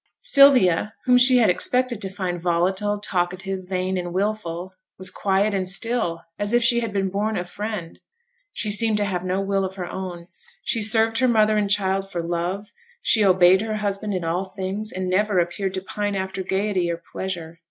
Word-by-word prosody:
Sylvia, 250 - +5
whom 250 -1 +5
she 250 0 +7
had 225 -6 +5
expected 250 +3 0
to 195 - -2
find 185 -3 -4
volatile, 190 +4 0
talkative, 185 -1 -3
vain, 185 0 -1
and 175 -1 -5
wilful, 185 -2 -3 0.2
was 185 - -3
quiet 200 +1 +1
and 185 -2 -1
still, 195 -5 -2 0.2
as 205 +2 -1
if 240 0 +4
she 235 0 +4
had 230 -2 -3
been 195 -2 -1
born 210 +3 -1
a 180 - -3
Friend: 205 -2 -6 0.5
she 210 - -2
seemed 220 0 +2
to 205 - 0
have 180 -3 -2
no 185 +1 -1
will 195 0 0
of 190 0 -4
her 185 -2 -4
own; 175 -2 -6 0.4
she 230 - 0
served 225 +1 +2
her 260 - +3
mother 215 -2 +3
and 210 -1 +1
child 195 -1 0
for 175 -3 -3
love; 175 +4 -3 0.3
she 220 - +4
obeyed 185 0 +5
her 220 -1 -3
husband 205 -1 -2
in 180 - -2
all 170 +3 -1
things, 195 +3 -5
and 185 0 -4
never 200 +2 +1
appeared 180 +2 -1
to 190 - -3
pine 205 +1 -3
after 190 0 -3
gaiety 190 -1 -1
or 170 - -2
pleasure. 170 -1 -6
195 Hz, 195 wpm, -23 LUFS, 180-210 Hz, 0.5 s, she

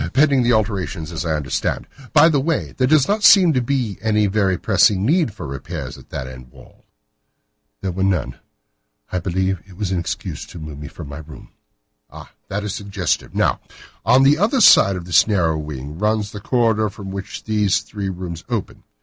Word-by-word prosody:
"Pending 140 0 +4
the 120 0 +2
alterations, 95 -7 -1
as 85 +1 -4
I 80 - 0
understand. 75 -2 -2 0.3
By 155 0 +6
the 150 -4 +2
way, 160 +3 -2
there 130 - +1
does 150 -1 +4
not 210 +2 0
seem 185 -6 +7
to 130 - +1
be 120 -5 -2
any 105 -1 +2
very 100 -2 +1
pressing 100 +2 +3
need 160 -1 +2
for 95 -5 -9
repairs 70 0 -6
at - - -16
that 65 - -5
end 65 -1 -11
wall." - - -19 1.0
"There 95 - -2
were 95 +2 -4
none. 80 -11 -1 0.7
I 90 - -1
believe 95 +2 -1
that 90 - -25
it - - -17
was 100 -3 -2
an 95 - 0
excuse 85 - -5
to - - -11
move 75 -3 -8
me 75 - -7
from 80 0 -10
my 70 +2 -8
room." 80 0 -12 0.6
"Ah! - - -12 0.2
that 105 +2 -3
is 105 -2 -3
suggestive. 100 -4 -3
Now, - - +1 0.4
on 125 +7 +5
the 145 +3 +4
other 230 +7 +2
side 100 - +7
of 90 -2 -6
this 90 +3 +4
narrow 90 -7 +1
wing 75 0 -7
runs 105 0 0
the 105 - -8
corridor 110 -3 +1
from 95 -1 -9
which 95 0 -7
these 105 -3 +1
three 100 -2 -5
rooms 85 -3 -6
open. - - -4
100 Hz, 200 wpm, -20 LUFS, 85-115 Hz, 1.0 s, seem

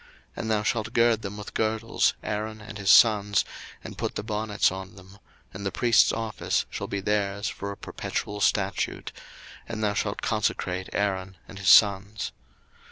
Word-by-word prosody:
02:029:009 - - -30
And 110 - -3
thou 105 -1 +1
shalt 110 +1 -1
gird 115 -2 +3
them 105 0 -6
with 105 - -8
girdles, 110 +1 +1
Aaron 110 +1 -3
and 105 0 -9
his 100 - -1
sons, 105 -3 +5 0.4
and - - -9
put - - -2
the 105 - -3
bonnets 105 -2 0
on 95 0 -8
them: 95 +1 -15 0.3
and 95 +1 -7
the 100 - -1
priest's 115 -7 +4
office 110 -1 -1
shall - - -4
be 100 - -3
theirs 100 0 -1
for 100 0 -5
a 100 - -8
perpetual 105 0 -4
statute: - - 0 0.6
and 110 -1 -4
thou 105 -1 +1
shalt 100 0 -2
consecrate 95 -3 -1
Aaron 95 -2 -2
and 95 - -10
his 95 0 +1
sons. 100 +1 +4
105 Hz, 170 wpm, -26 LUFS, 100-110 Hz, 0.6 s, sons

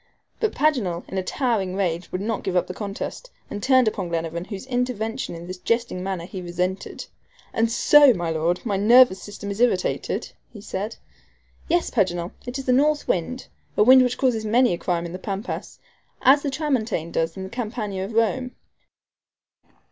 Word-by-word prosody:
But 440 - 0
Paganel, 240 - +1
in 190 - -2
a - - -2
towering 205 -4 -1
rage, 180 -3 -2
would 185 - -3
not 220 +1 -2
give 190 - -2
up 180 - +3
the 185 - -6
contest, 205 - -6 0.2
and 205 - -4
turned 260 0 +4
upon 195 -4 -2
Glenarvan, 165 +1 -3
whose 200 +2 -7
intervention 245 -6 -2
in 170 +1 -8
this 180 +1 -7
jesting 230 -1 -1
manner 185 -2 -3
he 185 +1 -7
resented. 180 +2 -3 0.5
"And 225 0 +1
so, 290 +3 +7
my 175 -6 -1
Lord, 165 +5 -1
my 205 -4 0
nervous 225 -1 +6
system 205 0 -7
is 200 +3 -4
irritated?" 210 -7 0 0.2
he 215 - -11
said. 205 +2 -4 0.7
"Yes, 345 0 +1
Paganel, 175 -5 0 0.2
it 245 +2 -4
is 270 - -6
the 255 - +3
north 295 +3 +2
wind 250 +9 -2 0.3
a - - +6
wind 260 +3 +8
which 250 -1 +1
causes 245 -5 +1
many 235 0 +3
a - - -2
crime 175 -2 -1
in 170 - -6
the 185 - -6
Pampas, 200 +3 -5 0.5
as 275 +3 +6
the 285 - -2
TRAMONTANE 250 - -1
does 165 +1 -1
in 190 - -5
the 190 - -6
Campagna 215 -4 -4
of 200 +4 -6
Rome." 240 +3 0
205 Hz, 185 wpm, -23 LUFS, 185-250 Hz, 0.7 s, wind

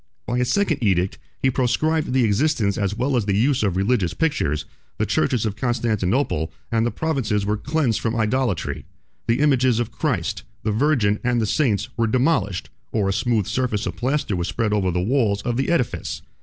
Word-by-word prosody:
By 120 +1 -1
a 125 - +2
second 185 0 +1
edict, 95 -2 +1 0.2
he 130 - +4
proscribed 145 +5 +1
the 130 -1 +3
existence 110 -2 +2
as 100 0 -1
well 130 +3 0
as 115 -4 0
the 100 -1 +2
use 130 +4 +2
of 95 -4 0
religious 100 -3 +1
pictures; 75 - 0 0.3
the - - +1
churches 120 -4 +1
of 105 -2 -2
Constantinople 115 - 0 0.2
and 115 0 +2
the - - +1
provinces 120 -10 -1
were 105 +1 +1
cleansed 130 0 0
from 115 0 -1
idolatry; 115 -3 -1 0.4
the 120 +4 +2
images 130 -5 +3
of 120 - -2
Christ, - - -1 0.2
the 110 - 0
Virgin, 110 -4 +2
and 125 -1 +1
the 110 - +1
saints, 110 -3 +1
were 115 -1 +2
demolished, 110 - 0 0.2
or 105 -3 +1
a - - +1
smooth 110 0 +1
surface 115 -1 -1
of - - -3
plaster 130 -4 -1
was 85 0 -2
spread 110 -3 -1
over 100 -3 +1
the 90 0 0
walls 105 -2 +1
of 120 - -1
the 135 +2 0
edifice. 125 -8 -1
115 Hz, 190 wpm, -22 LUFS, 100-130 Hz, 0.4 s, he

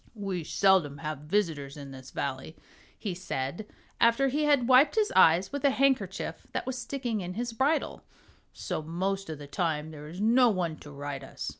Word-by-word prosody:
"We 195 -5 -3
seldom 170 -4 +3
have 155 -2 -4
visitors 155 -8 -1
in 140 -1 -9
this 130 -1 -10
Valley," 135 +3 -4 0.4
he 200 -4 -4
said, 175 +1 -4 0.3
after 235 +4 +4
he 300 +3 0
had 285 -5 +3
wiped 260 +7 +6
his 430 -1 +2
eyes 170 +4 +5
with 285 0 -4
a 280 - +6
handkerchief 260 -8 0
that - - -2
was 260 - -3
sticking 245 -3 -3
in 180 0 -5
his 235 +1 -3
bridle, 275 +7 0 0.5
"so - - -4
most 190 +5 -2
of 155 - -5
the 145 - -9
time 155 +1 -2
there 150 -1 -9
is 170 +4 -9
no 240 +4 +5
one 175 -6 -1
to 145 - -12
ride 145 -1 -6
us. - - -6
185 Hz, 185 wpm, -29 LUFS, 155-245 Hz, 0.5 s, wiped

